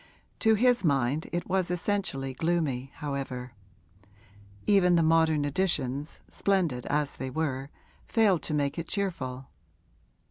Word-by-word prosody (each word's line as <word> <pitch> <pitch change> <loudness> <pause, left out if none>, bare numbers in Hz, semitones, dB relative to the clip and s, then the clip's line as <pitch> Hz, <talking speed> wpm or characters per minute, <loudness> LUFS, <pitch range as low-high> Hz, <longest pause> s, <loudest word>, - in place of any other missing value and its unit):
To 220 -1 +4
his 245 +1 +3
mind 140 -1 +1
it 175 - -2
was 185 -2 +1
essentially 180 -7 -1
gloomy, 145 -4 -1
however; 135 -4 -4 1.1
even 180 -3 +5
the 165 - +4
modern 160 -2 +3
additions, 145 -4 -1
splendid 175 -11 0
as 145 -1 -1
they 130 - -4
were, 135 -1 -2 0.4
failed 205 -7 +3
to - - -4
make 145 +2 0
it 165 - -5
cheerful. 135 -10 -3
160 Hz, 120 wpm, -28 LUFS, 135-180 Hz, 1.1 s, even